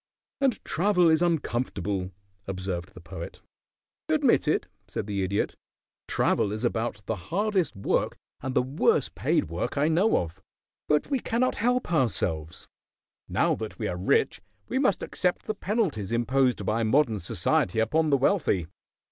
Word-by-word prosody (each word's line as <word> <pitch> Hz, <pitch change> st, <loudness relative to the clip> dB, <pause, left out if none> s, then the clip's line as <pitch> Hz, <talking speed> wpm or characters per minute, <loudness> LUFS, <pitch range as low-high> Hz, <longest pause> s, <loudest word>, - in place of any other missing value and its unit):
"And 270 Hz, -3 st, +1 dB
travel 180 Hz, -1 st, +3 dB
is 160 Hz, +1 st, +3 dB
uncomfortable," 110 Hz, -, -1 dB, 0.4 s
observed 95 Hz, -2 st, -4 dB
the 90 Hz, -, -11 dB
Poet. 80 Hz, -, -8 dB, 0.7 s
"Admitted," -, -, +2 dB, 0.2 s
said -, -, -4 dB
the 100 Hz, -2 st, -2 dB
Idiot. 95 Hz, +2 st, 0 dB, 0.5 s
"Travel 100 Hz, -, +1 dB
is 110 Hz, +2 st, -3 dB
about 115 Hz, -3 st, -2 dB
the 110 Hz, -, -1 dB
hardest 195 Hz, 0 st, 0 dB
work 100 Hz, -, 0 dB, 0.2 s
and 130 Hz, -1 st, -4 dB
the -, -, +4 dB
worst 135 Hz, +4 st, +1 dB
paid -, -, +1 dB
work 85 Hz, -, -3 dB
I 145 Hz, +3 st, +3 dB
know 185 Hz, +8 st, +3 dB
of, 85 Hz, +2 st, -4 dB, 0.5 s
but 150 Hz, -, +1 dB
we 270 Hz, -, +2 dB
cannot 245 Hz, +2 st, +1 dB
help 245 Hz, -3 st, 0 dB
ourselves. 85 Hz, -, -1 dB, 0.6 s
Now -, -, +2 dB
that -, -, -5 dB
we -, -, -2 dB
are -, -, -2 dB
rich 90 Hz, +2 st, +1 dB, 0.3 s
we -, -, 0 dB
must 255 Hz, -9 st, +2 dB
accept 180 Hz, -1 st, -1 dB
the 215 Hz, -, -1 dB
penalties 190 Hz, -, -1 dB
imposed 125 Hz, -1 st, +1 dB
by 110 Hz, +4 st, +1 dB
modern 115 Hz, -1 st, +2 dB
society 90 Hz, +2 st, 0 dB
upon 155 Hz, +9 st, +2 dB
the 140 Hz, -, +4 dB
wealthy. 135 Hz, -, +2 dB
125 Hz, 150 wpm, -27 LUFS, -, 0.7 s, the